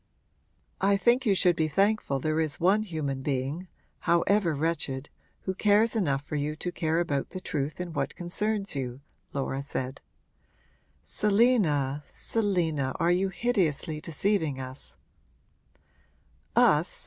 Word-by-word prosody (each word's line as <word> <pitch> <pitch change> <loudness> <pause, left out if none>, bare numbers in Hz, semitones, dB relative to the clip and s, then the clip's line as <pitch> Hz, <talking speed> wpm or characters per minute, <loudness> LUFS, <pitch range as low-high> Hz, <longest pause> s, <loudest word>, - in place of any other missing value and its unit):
'I 200 +1 +4
think 240 +4 +3
you 200 - +4
should 180 -2 +4
be 160 -1 +1
thankful 195 -2 +1
there 155 +3 0
is 155 -2 -1
one 195 +5 +4
human 155 -9 -3
being 140 +6 -2 0.4
however 170 0 +3
wretched 145 -3 -2 0.3
who 190 - -2
cares 210 +3 +3
enough 145 -10 +1
for - - -5
you 150 +1 -1
to 175 +3 -4
care 165 -1 0
about 145 -5 -1
the 185 - -6
truth 150 -4 -3
in 180 -2 -4
what - - -2
concerns 200 +3 -2
you,' 130 -2 -4 0.3
Laura 135 -1 -2
said. 130 -1 -4 1.0
'Selina, 195 - +2
Selina 165 - 0
are 170 - +3
you 190 +2 +2
hideously 175 - 0
deceiving 160 -4 0
us?' 130 +1 -8 1.6
'Us?' - - +3
165 Hz, 130 wpm, -28 LUFS, 145-200 Hz, 1.6 s, I